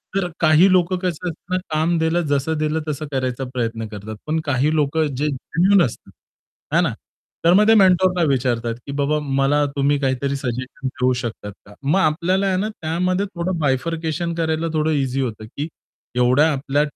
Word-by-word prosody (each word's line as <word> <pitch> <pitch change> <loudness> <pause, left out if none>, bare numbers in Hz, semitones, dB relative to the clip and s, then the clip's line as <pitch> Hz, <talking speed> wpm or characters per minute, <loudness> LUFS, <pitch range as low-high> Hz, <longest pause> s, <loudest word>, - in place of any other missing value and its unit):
तर 185 -2 0
काही 165 +4 +5
लोकं 180 0 +3
कसं 180 -1 -3
असतात 185 +3 -4
काम 165 +2 +1
दिलं, 160 +2 +1
जसं 145 +3 0
दिलं 155 +1 0
तसं 150 +1 -3
करायचा 130 -1 -2
प्रयत्न 115 -2 -2
करतात. 105 +1 -8
पण 160 +1 0
काही 145 +2 +1
लोकं 155 +1 +1
जे 150 +3 0
जेन्युइन 175 +7 +2
असतात. 115 - -8 0.6
है - - +5
ना? - - 0 0.5
तर 170 - +6
मग 210 +3 +5
ते 225 - +7
मेंटरला 185 -3 +4
विचारतात, 120 -3 0
की 140 - -6
बाबा 145 +2 +1
मला 140 +1 +2
तुम्ही 140 +1 +2
काहीतरी 135 +1 -1
सजेशन 130 +1 -4
देऊ 130 -1 0
शकतात 110 -3 -6
का? 105 - -15
मग 155 +8 +2
आपल्याला 180 +5 +1
आहे 185 -1 +1
ना 210 +3 -1
त्यामध्ये 180 +1 -1
थोडं 185 -2 -3
बायफरकेशन 160 +4 -1
करायला 160 0 -1
थोडं 155 0 +1
ईझी 135 -2 0
होतं, 110 -3 -4
की 145 +7 -5 0.5
एवढ्या 130 +6 +4
आपल्या 140 +1 0
150 Hz, 175 wpm, -21 LUFS, 135-170 Hz, 0.6 s, ते